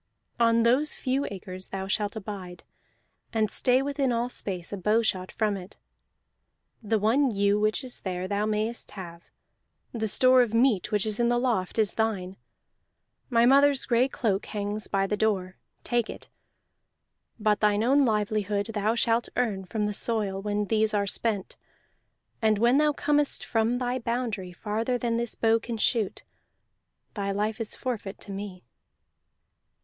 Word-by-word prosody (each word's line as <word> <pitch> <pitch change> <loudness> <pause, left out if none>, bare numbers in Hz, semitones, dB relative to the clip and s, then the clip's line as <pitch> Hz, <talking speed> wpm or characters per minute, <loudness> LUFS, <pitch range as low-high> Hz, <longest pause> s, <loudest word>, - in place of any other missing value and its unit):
On 230 0 +4
those 260 +6 +2
few 265 +1 -1
acres 185 -1 -7
thou 190 0 -4
shalt 205 +1 -1
abide, 195 -4 -7 0.7
and 215 -3 +1
stay 255 +1 +3
within 275 -2 0
all 235 +1 0
space 185 -6 -4
a - - -3
bowshot 210 -2 +1
from 215 -2 0
it. 185 +1 -10 1.0
The 220 0 +1
one 240 +7 +3
ewe 200 -1 +2
which 215 +3 +1
is 255 -1 -5
there 185 -1 -4
thou 205 +2 0
mayest 215 +2 -1
have; 170 -3 -8 0.7
the 220 -2 -2
store 255 +4 +5
of 230 -2 0
meat 230 -5 +2
which 210 -1 +1
is 215 0 -1
in 235 0 +3
the 240 - +2
loft 235 -7 0
is 215 -2 +2
thine; 195 -5 -1 0.9
my 235 -2 +4
mother's 275 +1 +5
gray 245 +1 +3
cloak 215 -7 -1
hangs 210 0 -3
by 195 -1 +1
the 210 - -1
door: 195 -4 -1 0.3
take 240 -2 0
it. - - -9 1.1
But 210 -1 +2
thine 210 0 +2
own 275 +4 +4
livelihood 210 -2 0
thou 215 +2 +1
shalt 235 0 +1
earn 210 -6 0
from 210 +3 -2
the 210 - -1
soil 205 -3 -1
when 205 0 -1
these 215 0 +1
are 200 -1 +1
spent; 205 -1 -2 0.8
and 215 -1 +3
when 240 +6 +4
thou 300 0 +4
comest 295 0 0
from 225 +2 +1
thy 250 0 -1
boundary 230 -6 -3
farther 220 +7 -2
than 235 -1 -1
this 235 -1 -2
bow 225 0 +3
can 230 0 -5
shoot, 215 -2 0 0.9
thy 200 -2 -3
life 210 +3 -1
is 225 - 0
forfeit 220 -6 -4
to 200 - -8
me." 195 -2 -7
215 Hz, 160 wpm, -27 LUFS, 200-235 Hz, 1.1 s, store